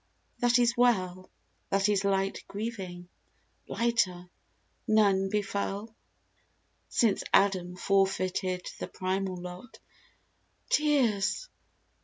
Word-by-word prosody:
That 245 0 +4
is 240 -1 +3
well 185 -7 +1 0.2
— - - -43
That 195 +1 +2
is 205 -1 +1
light 195 0 0
grieving! 195 -5 -6 0.6
lighter, 185 -7 0 0.6
none 200 -3 +3
befell, 205 +1 -3 0.9
Since 225 -4 +2
Adam 185 -3 +3
forfeited 185 -1 0
the - - -4
primal 185 0 -2
lot. 180 +6 -9 0.9
Tears 280 - +2
195 Hz, 90 wpm, -29 LUFS, 185-225 Hz, 0.9 s, That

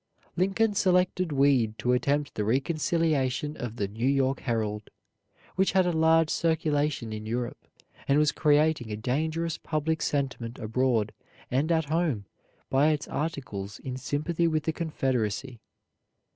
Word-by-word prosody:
Lincoln 195 +4 +2
selected 180 -2 +2
Weed 135 -6 +3
to 125 - +1
attempt 140 +3 0
the 105 - -2
reconciliation 150 +2 0
of 120 -2 -5
the 100 -4 -1
"New 110 +5 -2
York 135 -1 +2
Herald," 110 -3 -2 0.7
which 190 +1 +2
had 190 -1 +4
a 175 - +2
large 160 0 +4
circulation 150 - 0
in 110 0 -6
Europe, 120 +1 -4 0.4
and 140 - +4
was 150 0 +4
creating 150 -5 +2
a 105 - -3
dangerous 155 +8 -1
public 160 +1 -1
sentiment 130 -4 -2
abroad 115 -1 0 0.4
and 140 +6 +1
at 160 -2 +2
home 150 - 0 0.4
by 135 +3 +3
its 155 -1 0
articles 130 -10 -4
in 130 -1 -6
sympathy 155 +6 -1
with 155 -2 0
the 160 - -1
Confederacy. 130 - -2
145 Hz, 140 wpm, -27 LUFS, 120-160 Hz, 0.7 s, had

